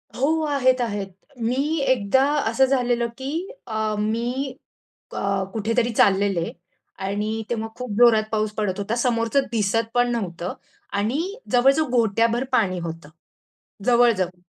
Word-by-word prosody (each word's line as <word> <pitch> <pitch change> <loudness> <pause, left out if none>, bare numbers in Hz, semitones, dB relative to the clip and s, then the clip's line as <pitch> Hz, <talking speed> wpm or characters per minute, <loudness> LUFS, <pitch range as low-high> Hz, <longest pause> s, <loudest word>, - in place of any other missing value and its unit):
हो, 315 +5 +1
आहेत-आहेत. 255 -8 +1 0.3
मी 275 +7 0
एकदा 260 +1 +3 0.3
असं 265 +4 +4
झालेलं 245 -3 +1
की 270 +1 -4 0.4
अ, 220 -1 -1
मी 240 +5 -1 0.6
क - - -9 0.4
कुठेतरी 230 +2 0
चाललेले 195 -4 +2 0.5
आणि 205 +2 -2 0.2
तेव्हा 225 -2 -2
खूप 250 -3 -6
जोरात 230 -3 +6
पाऊस 215 -1 0
पडत 200 -2 -1
होता, 215 +3 -2
समोरचं 235 +1 +1
दिसत 225 +1 +1
पण 245 0 +3
नव्हतं 180 -6 -3 0.4
आणि 225 +9 0 0.3
जवळ-जवळ 270 +4 +4
घोठ्याभर 230 +1 +2
पाणी 185 -7 +2
होतं, 165 -2 -7 0.8
जवळ-जवळ 225 -8 +3
230 Hz, 120 wpm, -23 LUFS, 205-250 Hz, 0.8 s, जोरात